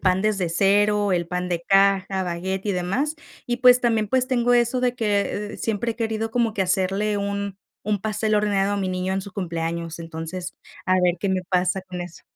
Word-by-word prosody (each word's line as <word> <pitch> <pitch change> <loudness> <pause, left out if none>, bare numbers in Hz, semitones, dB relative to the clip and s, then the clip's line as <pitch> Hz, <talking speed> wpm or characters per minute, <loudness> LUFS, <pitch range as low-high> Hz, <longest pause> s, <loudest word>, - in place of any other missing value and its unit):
pan 185 -1 +2
desde 200 -4 0
cero, 205 +3 +3
el 170 -1 0
pan 180 0 -2
de 170 -1 -2
caja, 195 -1 +3
baguette 185 +3 -3
y 200 - +1
demás. 195 - -1 0.3
Y 240 0 -1
pues 250 0 +7
también, 225 -3 +1
pues, 255 +3 +2
tengo 245 -2 +2
eso 240 +1 +2
de 245 -1 0
que, 205 -2 -1
eh, - - -7
siempre 225 +1 -1
he - - -22
querido 225 -1 -2
como 235 -2 +1
que 200 -2 0
hacerle 195 +3 0
un 200 -1 -3 0.3
un 210 -2 0
pastel 215 +1 0
horneado 205 -1 +2
a - - 0
mi 195 -2 -1
niño 185 +1 -1
en 195 - -1
su 200 - -10
cumpleaños, 170 -2 -3
entonces 165 +2 -6 0.3
a 185 0 +3
ver 180 -1 +2
qué 200 - -1
me 190 - +1
pasa 185 +1 +1
con 185 -1 -8
eso. 175 -1 -11
195 Hz, 210 wpm, -23 LUFS, 185-215 Hz, 0.3 s, pues